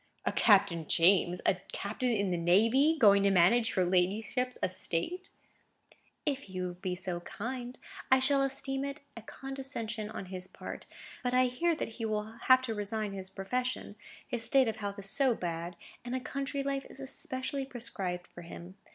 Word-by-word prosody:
"A -, -, +2 dB
Captain 190 Hz, -7 st, +4 dB
James! 180 Hz, 0 st, +4 dB
A 185 Hz, -, +3 dB, 0.2 s
captain 220 Hz, +5 st, -2 dB
in 200 Hz, -5 st, +1 dB
the -, -, +1 dB
navy! 225 Hz, -, +4 dB
going 200 Hz, -6 st, +6 dB
to 200 Hz, -, +4 dB
manage 195 Hz, +6 st, +4 dB
your 185 Hz, -, +3 dB
ladyship's 205 Hz, +8 st, +1 dB
estate!" 185 Hz, -, -1 dB, 1.0 s
"If 280 Hz, -2 st, +1 dB
he 185 Hz, -1 st, -6 dB
will 180 Hz, -1 st, -2 dB
be 180 Hz, +1 st, -3 dB
so 180 Hz, -1 st, -3 dB
kind. 245 Hz, +7 st, -6 dB, 0.3 s
I 260 Hz, -, +7 dB
shall 275 Hz, +1 st, +3 dB
esteem 270 Hz, 0 st, -1 dB
it 280 Hz, +1 st, -5 dB
a 230 Hz, -, -7 dB
condescension 235 Hz, -4 st, -4 dB
on 195 Hz, -, -6 dB
his 185 Hz, 0 st, -3 dB
part; -, -, -8 dB, 0.3 s
but 250 Hz, 0 st, 0 dB
I 255 Hz, 0 st, +5 dB
hear 325 Hz, +7 st, +1 dB
that 305 Hz, -, -3 dB
he 225 Hz, -, -1 dB
will 215 Hz, -1 st, 0 dB, 0.2 s
have 255 Hz, 0 st, +7 dB
to 230 Hz, -3 st, -2 dB
resign 210 Hz, 0 st, -2 dB
his 190 Hz, -1 st, -5 dB
profession, 245 Hz, +4 st, -3 dB, 0.3 s
his 240 Hz, -4 st, -3 dB
state 260 Hz, +3 st, +4 dB
of 220 Hz, -, -2 dB
health 200 Hz, -1 st, -4 dB
is 200 Hz, -1 st, -4 dB
so 255 Hz, +4 st, +2 dB
bad, 170 Hz, -1 st, -4 dB, 0.3 s
and 245 Hz, +1 st, -3 dB
a -, -, 0 dB
country 275 Hz, +2 st, -3 dB
life 275 Hz, 0 st, -2 dB
is -, -, -12 dB
especially 265 Hz, 0 st, -3 dB
prescribed 195 Hz, -9 st, -4 dB
for 175 Hz, -, -12 dB
him. 175 Hz, +2 st, -10 dB
220 Hz, 175 wpm, -31 LUFS, 185-260 Hz, 1.0 s, I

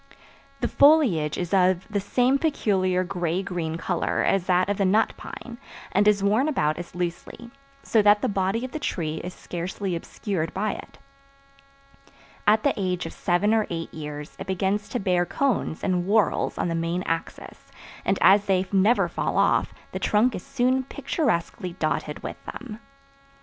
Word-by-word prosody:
The 240 Hz, -, +1 dB
foliage 250 Hz, -, +4 dB
is 175 Hz, +1 st, -3 dB
of 185 Hz, -1 st, +3 dB
the 210 Hz, -2 st, -1 dB
same 250 Hz, +7 st, +2 dB
peculiar 190 Hz, -, +1 dB
gray 175 Hz, 0 st, -2 dB
green 165 Hz, -4 st, -3 dB
color 175 Hz, +1 st, -1 dB
as 195 Hz, -2 st, +1 dB
that 180 Hz, 0 st, +3 dB
of 205 Hz, -1 st, -1 dB
the -, -, +3 dB
nut 200 Hz, +4 st, +3 dB
pine, 240 Hz, -1 st, -9 dB, 0.3 s
and 205 Hz, +2 st, +3 dB
is 205 Hz, -2 st, +3 dB
worn 215 Hz, +8 st, +3 dB
about 155 Hz, -, 0 dB
as 175 Hz, 0 st, -8 dB
loosely, 180 Hz, +7 st, -5 dB, 0.3 s
so 220 Hz, -, +3 dB
that 205 Hz, 0 st, +4 dB
the -, -, +3 dB
body 195 Hz, +4 st, 0 dB
of 260 Hz, -, -8 dB
the 310 Hz, -, -4 dB
tree 160 Hz, -, -2 dB
is 180 Hz, -, -5 dB
scarcely 180 Hz, +2 st, -4 dB
obscured 170 Hz, -1 st, -4 dB
by 210 Hz, +2 st, 0 dB
it. -, -, -9 dB, 1.5 s
At 215 Hz, +1 st, +5 dB
the -, -, +3 dB
age 180 Hz, -2 st, -1 dB
of -, -, -6 dB
seven 200 Hz, +4 st, +1 dB
or 220 Hz, -1 st, +2 dB
eight 165 Hz, -1 st, -5 dB
years 150 Hz, -1 st, -7 dB
it -, -, -6 dB
begins 190 Hz, +2 st, -1 dB
to 245 Hz, -, -2 dB
bear 180 Hz, -3 st, +2 dB
cones 245 Hz, -, -1 dB
in 180 Hz, -2 st, 0 dB
whorls 210 Hz, -4 st, +2 dB
on -, -, 0 dB
the 170 Hz, -, -1 dB
main 165 Hz, +2 st, -1 dB
axis, 165 Hz, 0 st, -5 dB, 0.3 s
and 195 Hz, -, +1 dB
as 200 Hz, +1 st, +6 dB
they 190 Hz, -1 st, +2 dB
never 200 Hz, +5 st, +3 dB
fall -, -, -2 dB
off, -, -, +3 dB, 0.2 s
the -, -, -4 dB
trunk 220 Hz, +4 st, +2 dB
is -, -, -5 dB
soon 260 Hz, 0 st, +1 dB
picturesquely 185 Hz, -, -2 dB
dotted 155 Hz, -2 st, -2 dB
with -, -, -7 dB
them. 225 Hz, -4 st, -8 dB
190 Hz, 170 wpm, -25 LUFS, 175-215 Hz, 1.5 s, as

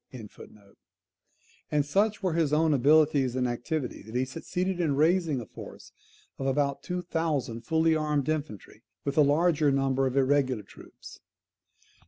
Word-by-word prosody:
] -, -, -39 dB, 1.6 s
and 150 Hz, -1 st, +1 dB
such 205 Hz, +7 st, 0 dB
were 185 Hz, -3 st, 0 dB
his 160 Hz, -3 st, +1 dB
own 155 Hz, +1 st, +3 dB
abilities 145 Hz, -1 st, +3 dB
and 125 Hz, -1 st, 0 dB
activity, 125 Hz, +3 st, -3 dB
that 110 Hz, +3 st, -11 dB
he 130 Hz, +1 st, +1 dB
succeeded 180 Hz, +6 st, -3 dB
in 155 Hz, -5 st, +1 dB
raising 160 Hz, -1 st, +2 dB
a 120 Hz, -, -7 dB
force -, -, -12 dB, 0.5 s
of 135 Hz, -, -2 dB
about 140 Hz, 0 st, 0 dB
two 180 Hz, 0 st, -4 dB
thousand 155 Hz, -9 st, -2 dB
fully 160 Hz, +5 st, +2 dB
armed 150 Hz, -2 st, -1 dB
infantry, 150 Hz, -, -4 dB, 0.2 s
with 140 Hz, -, -2 dB
a 155 Hz, -, +5 dB
larger 150 Hz, +1 st, +3 dB
number 135 Hz, -1 st, +1 dB
of 130 Hz, +1 st, -3 dB
irregular 130 Hz, -4 st, +1 dB
troops. -, -, -14 dB
145 Hz, 150 wpm, -27 LUFS, 135-160 Hz, 1.6 s, a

